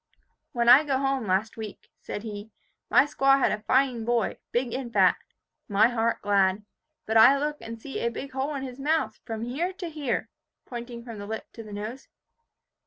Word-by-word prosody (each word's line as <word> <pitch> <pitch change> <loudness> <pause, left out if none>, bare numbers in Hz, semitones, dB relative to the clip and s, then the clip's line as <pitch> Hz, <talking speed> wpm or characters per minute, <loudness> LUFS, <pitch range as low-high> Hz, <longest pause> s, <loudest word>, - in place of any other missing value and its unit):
"When 235 -1 0
I 255 +5 +9
go 275 -3 0
home, 270 -4 -1
last 195 +5 0
week," 215 -2 -8
said 205 - -6
he, 210 -1 -7 0.4
"my - - +6
squaw 275 -1 +3
had 275 - +2
a 210 - -2
fine 255 +1 +2
boy, 235 -2 0
big 240 0 -1
and 255 -2 -4
fat. - - +5 0.5
My 205 +3 +4
heart 230 -1 0
glad. 200 0 +2 0.4
But 220 +1 +2
I 250 +5 +8
look 295 +1 -2
and 230 0 -7
see 270 +4 -6
a 235 - 0
big 265 +3 -7
hole 270 +3 -2
in 270 - -4
his 255 0 -7
mouth, 310 +4 0
from 225 -2 -4
here 285 +10 -2
to 360 -3 -6
here," 290 -6 -2 0.4
pointing 235 -1 -7
from 230 -4 -8
the 205 - -7
lip 220 +1 -6
to 230 - -9
the 215 -2 -11
nose. 215 +6 -6
240 Hz, 195 wpm, -26 LUFS, 220-270 Hz, 0.5 s, I